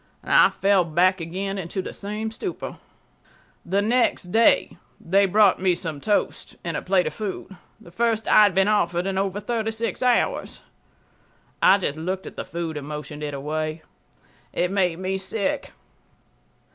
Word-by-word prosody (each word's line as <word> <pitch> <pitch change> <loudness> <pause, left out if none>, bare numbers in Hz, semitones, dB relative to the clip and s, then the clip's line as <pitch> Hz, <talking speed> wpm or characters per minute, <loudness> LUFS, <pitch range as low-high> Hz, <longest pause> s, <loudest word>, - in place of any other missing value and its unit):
I - - +5
fell 195 -2 +2
back 175 +3 +2
again 195 +4 -4
into 180 +1 -5
the 185 - -4
same 210 +2 -4
stupor. 355 - -6 0.8
The 195 +3 0
next 225 -5 +1
day 225 +3 +3 0.2
they 195 +3 +2
brought 205 0 +4
me 185 -2 +3
some 160 -5 -5
toast 210 +4 -1
and - - -3
a - - -2
plate 185 -1 +2
of - - -3
food, 200 -2 -6 0.2
the 170 - -15
first 225 +2 0
I - - +5
had 205 -3 +5
been 195 +1 +4
offered 180 -4 +1
in 195 -1 -1
over 195 +1 -1
36 225 +1 -3
hours. 250 - +1 1.0
I 195 - +6
just 155 -6 -2
looked 185 +4 -3
at - - -9
the - - -4
food 165 -2 -4
and 145 -1 -7
motioned 150 0 -7
it 145 -1 -4
away. 155 +3 -3 0.7
It 180 +1 0
made 180 -4 +1
me 190 +1 -2
sick 195 +1 -2
190 Hz, 160 wpm, -24 LUFS, 170-210 Hz, 1.0 s, I